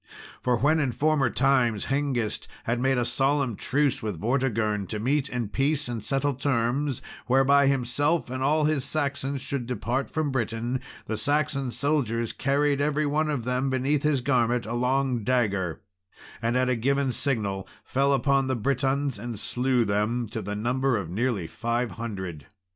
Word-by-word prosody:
For 125 -1 +2
when 155 +6 +3
in 135 -4 +1
former 150 -3 +2
times 125 -6 +2
Hengist 135 -5 -1 0.2
had 120 +1 -1
made 135 +1 +2
a 120 - +1
solemn 135 0 +1
truce 140 +4 +1
with 105 -7 -4
Vortigern, 110 -4 0
to 105 - -4
meet 135 +5 0
in 120 -3 -2
peace 140 +4 0
and 115 -3 -4
settle 135 +5 0
terms, 130 +1 0 0.2
whereby 135 +2 +5
himself 140 +3 +1
and 130 0 -3
all 150 +3 +3
his 150 -3 +1
Saxons 140 -2 -2
should 130 -4 -4
depart 125 +2 -2
from 155 -3 -1
Britain, 120 0 -2 0.2
the 110 - -3
Saxon 145 +2 0
soldiers 120 -5 0
carried 140 +1 +1
every 150 +1 +1
one 155 +2 +1
of 140 -6 -1
them 125 +2 0
beneath 135 +2 +1
his 150 -3 +1
garment 120 -2 +1
a 115 - -4
long 125 -1 +1
dagger, 100 -8 0 0.6
and, 115 +2 +1
at 130 0 +2
a 130 - +2
given 135 +3 +1
signal, 105 -8 -1 0.2
fell 140 +1 +1
upon 135 0 +2
the 130 - 0
Britons, 135 +1 0
and 115 -1 -5
slew 125 +1 +1
them, 110 +4 0
to 110 - -4
the 105 +1 -4
number 125 +3 +1
of 90 -5 -5
nearly 110 -2 0
five 120 +7 -2
hundred. 95 -10 -6
130 Hz, 165 wpm, -26 LUFS, 115-140 Hz, 0.6 s, whereby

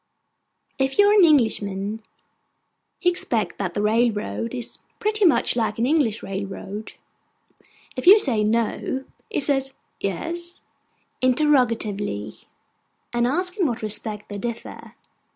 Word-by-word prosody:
If 270 0 0
you 410 0 +6
are - - +5
an 410 -3 +6
Englishman, 220 - +2 1.0
he 355 -1 +3
expects 235 -10 -1
that 185 -4 -3
that - - -1
railroad 210 - 0
is 240 - -5 0.2
pretty 425 -1 +1
much 320 - +4
like 220 -3 -1
an 230 - +1
English 260 -7 +1
railroad. 195 +2 -6 1.0
If - - -5
you 400 +3 +11
say 240 - +2
'No,' 230 +4 -1 0.2
he 440 - -1
says 270 -1 0 0.2
'Yes?' 340 - -5 0.6
(interrogatively), 235 - +1 0.8
and 240 0 +2
asks 360 - -1
in 365 -6 +2
what 240 -3 -4
respect 210 0 0
they 205 -1 -5
differ. 235 +1 -7
235 Hz, 125 wpm, -23 LUFS, 210-300 Hz, 1.0 s, you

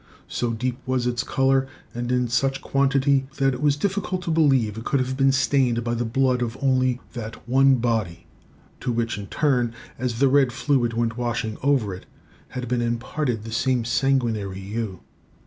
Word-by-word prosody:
So 120 -1 -2
deep 125 +2 -2
was 130 -1 0
it 120 0 0
in - - -10
colour, 135 0 +2 0.3
and 120 +1 -3
in 125 -1 +2
such 135 +3 0
quantity, 135 0 +2
that 135 -1 +2
it 125 - -6
was 145 -1 +3
difficult 185 +1 -2
to 170 - -2
believe 135 -9 +3
it 115 - -6
could 140 - +1
have 130 0 -1
been 135 0 +4
stained 130 -3 +2
by 120 0 -1
the 120 0 -1
blood 125 +2 +1
of 120 +1 -2
only 130 -2 +2
that 115 -1 -7
one 135 +2 +5
body, 110 -9 -1 0.5
to 125 - -2
which 115 -2 -1
in 100 - -7
turn, 125 -5 +1 0.2
as 125 -2 -2
the 140 +3 +4
red 135 -1 +4
fluid 125 -2 +1
went 115 0 -1
washing 120 -2 -2
over 130 -8 +2
it, 90 - -10 0.4
had 125 -1 -5
been 120 0 0
imparted 120 0 -2
the 115 - -7
same 125 0 +1
sanguinary 115 -7 0
hue. 100 -1 -4
125 Hz, 185 wpm, -24 LUFS, 115-135 Hz, 0.5 s, one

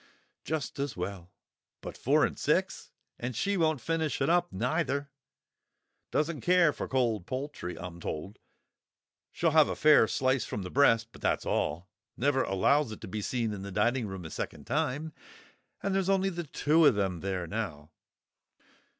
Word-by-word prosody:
"Just 155 -2 -3
as 140 -7 -3
well. 90 -1 -5 0.5
But—four - - +1
and - - -3
six! - - 0 0.3
And 120 0 -4
she 200 - 0
won't 160 -5 +2
finish 160 +1 -1
it - - +2
up 175 0 +2
neither; 140 - -1 1.0
doesn't 155 0 -1
care 175 -4 +4
for - - -5
cold 115 -8 0
poultry, 130 -9 -5
I'm 90 -1 -8
told; 85 +5 -6 0.9
she'll 165 -2 +1
have 155 -1 +6
a - - -2
fair 150 -7 +6
slice 130 0 +1
from 105 - -4
the 90 - -7
breast, 115 -5 +4
but - - -15
that's - - 0
all; 85 +6 -1 0.3
never 135 +1 +2
allows 125 +7 +2
it 110 - -8
to - - -7
be 105 +3 -4
seen 115 0 -1
in 100 - -6
the 100 0 -6
dining 120 +4 +1
room 95 -3 -7
a 80 - -7
second - - -5
time. 150 +4 -1 0.7
And 195 - 0
there's 195 -1 +1
only 195 0 +2
the 175 -1 -5
two 155 +3 +2
of 135 - +4
them 95 -4 -1
there 95 -1 -3
now. 80 -6 -5
130 Hz, 165 wpm, -30 LUFS, 100-155 Hz, 1.0 s, have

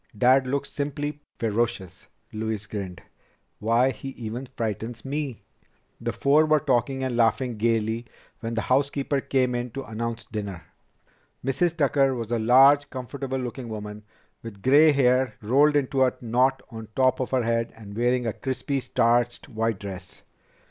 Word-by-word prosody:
"Dad 130 +3 +4
looks 140 +1 -2
simply 145 +1 -3 0.2
ferocious." 105 -5 -2 0.3
Louise 110 -1 -3
grinned. 100 -4 -6 0.6
"Why, 115 +4 +3
he 130 +3 -7
even 120 +3 -5
frightens 110 -1 -4
me!" 140 -3 -4 0.6
The - - -2
four 150 +3 +3
were 155 0 +4
talking 135 -1 0
and 130 -2 -1
laughing 120 +1 +2
gaily 115 +1 0 0.3
when 115 0 -4
the 115 - 0
housekeeper 140 +1 +1
came 130 -2 +1
in 120 0 -2
to 135 - -4
announce 115 +1 -4
dinner. 100 -5 -6 0.8
Mrs. 165 +6 +1
Tucker 140 -3 +3
was 115 -2 -5
a 120 - +1
large, 135 +5 +6
comfortable 130 +1 -5
looking 125 -1 -5
woman, 105 -1 -6 0.4
with 100 -4 -10
gray 150 +4 +6
hair 130 -4 +2
rolled 140 +7 +3
into 135 -1 +2
a 130 - +2
knot 125 +3 +1
on 110 -1 -8
top 130 -1 +3
of 130 - -2
her 130 -2 +1
head 115 0 0
and 105 -2 -11
wearing 120 +2 +1
a 115 - -1
crisply 135 +1 -2
starched 120 +1 +1
white 115 -3 -1
dress. 95 -2 -8
125 Hz, 155 wpm, -25 LUFS, 110-135 Hz, 0.8 s, large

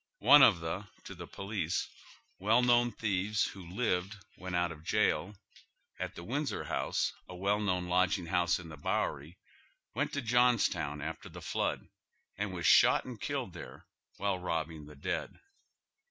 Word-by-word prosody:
One 145 - +8
of 115 -6 +8
tlie, 85 +5 -5 0.2
to - - -8
the 85 -2 -9
police, 95 -4 -3 0.5
well 110 +6 +3
known 120 0 +4
thieves 105 -1 0
who 95 -3 -6
lived, 95 -1 -1 0.2
when 90 -1 -5
out 85 -1 +1
of 80 -1 -10
jail, 100 0 +1 0.6
at - - -4
the 85 - -8
Windsor, 140 - -2
a 90 - -2
well 100 +3 +1
known 90 -4 -1
lodging 90 +1 +2
house 85 0 +2
in 85 -2 -10
the 75 - -9
Bowery, 75 +3 -2 0.6
went - - -1
to 140 - -2
Johns 120 0 +4
town 75 -4 -4
after - - -6
the - - -10
flood - - -2 0.5
and 105 0 -3
was 90 -2 -4
shot - - +6
and - - -8
killed - - -3
there - - -10 0.3
while 100 -2 -1
robbing 80 -3 -3
the 75 - -12
dead. 70 - -4
95 Hz, 160 wpm, -32 LUFS, 85-105 Hz, 0.6 s, One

